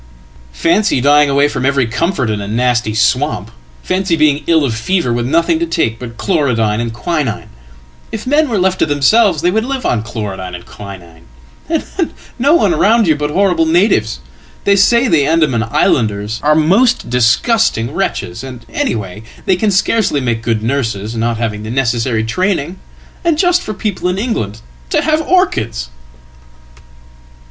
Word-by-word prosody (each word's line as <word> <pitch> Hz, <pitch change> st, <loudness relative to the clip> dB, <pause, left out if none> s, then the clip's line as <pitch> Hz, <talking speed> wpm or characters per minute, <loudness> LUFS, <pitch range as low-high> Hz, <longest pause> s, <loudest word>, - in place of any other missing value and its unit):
"Fancy 185 Hz, -1 st, +2 dB
dying 145 Hz, +2 st, +4 dB
away 140 Hz, +1 st, +3 dB
from 130 Hz, -, -4 dB
every 140 Hz, -1 st, +2 dB
comfort 130 Hz, -, -1 dB
in 105 Hz, -1 st, -2 dB
a 100 Hz, -, -6 dB
nasty 120 Hz, 0 st, 0 dB
swamp! 110 Hz, -, 0 dB, 0.3 s
Fancy 185 Hz, -2 st, 0 dB
being 150 Hz, -2 st, +2 dB
ill 165 Hz, -1 st, +4 dB
offever 125 Hz, -, -1 dB
with 120 Hz, 0 st, -1 dB
nothing 170 Hz, -, +1 dB
to 335 Hz, -, -1 dB
take 115 Hz, -, -1 dB
but 115 Hz, -2 st, -9 dB
chlorodyne 115 Hz, -, 0 dB
and 120 Hz, -1 st, -2 dB
quinine 145 Hz, -, -3 dB, 0.6 s
if 220 Hz, -1 st, -5 dB
men 295 Hz, +3 st, +2 dB
were 225 Hz, -, 0 dB
left 190 Hz, 0 st, +1 dB
tothemselves 155 Hz, +5 st, +3 dB
they 175 Hz, -, +3 dB
would 220 Hz, +3 st, 0 dB
live 265 Hz, +1 st, -4 dB
on 115 Hz, -, +1 dB
chlorodyne 100 Hz, -5 st, -6 dB
and 90 Hz, -, -10 dB
quinine 90 Hz, -6 st, -12 dB, 0.4 s
and 325 Hz, -2 st, -1 dB, 0.5 s
no 285 Hz, +6 st, +4 dB
one 340 Hz, -, +3 dB
round 225 Hz, -4 st, +3 dB
youbut 150 Hz, -3 st, +1 dB
horrible 175 Hz, -1 st, +2 dB
natives! 160 Hz, -, +1 dB, 0.4 s
They 200 Hz, -, +3 dB
say 235 Hz, +6 st, +4 dB
the 150 Hz, -8 st, +2 dB
Andaman 155 Hz, -8 st, +2 dB
islanders 110 Hz, -1 st, 0 dB
are 150 Hz, +1 st, +3 dB
most 195 Hz, -, +2 dB
disgustingwretches 125 Hz, -, 0 dB
and, 125 Hz, -3 st, -9 dB
anyhow, 105 Hz, -3 st, -2 dB, 0.3 s
they 190 Hz, -, +3 dB
can 210 Hz, +4 st, 0 dB
scarcely 195 Hz, -4 st, +1 dB
make 120 Hz, -4 st, -1 dB
good 115 Hz, -2 st, -1 dB
nurses, 115 Hz, -4 st, -2 dB
not 115 Hz, 0 st, -1 dB
having 110 Hz, -2 st, -3 dB
thenecessary 115 Hz, 0 st, -1 dB
training. 185 Hz, -, -1 dB, 0.4 s
And 335 Hz, -3 st, +1 dB
just 355 Hz, +1 st, +2 dB
for 215 Hz, -, -6 dB
people 190 Hz, -3 st, -2 dB
in 180 Hz, -, -2 dB
England 115 Hz, -, -3 dB, 0.3 s
to -, -, +1 dB
have 310 Hz, 0 st, +1 dB
orchids!"" 120 Hz, -, 0 dB
145 Hz, 155 wpm, -15 LUFS, -, 0.6 s, dying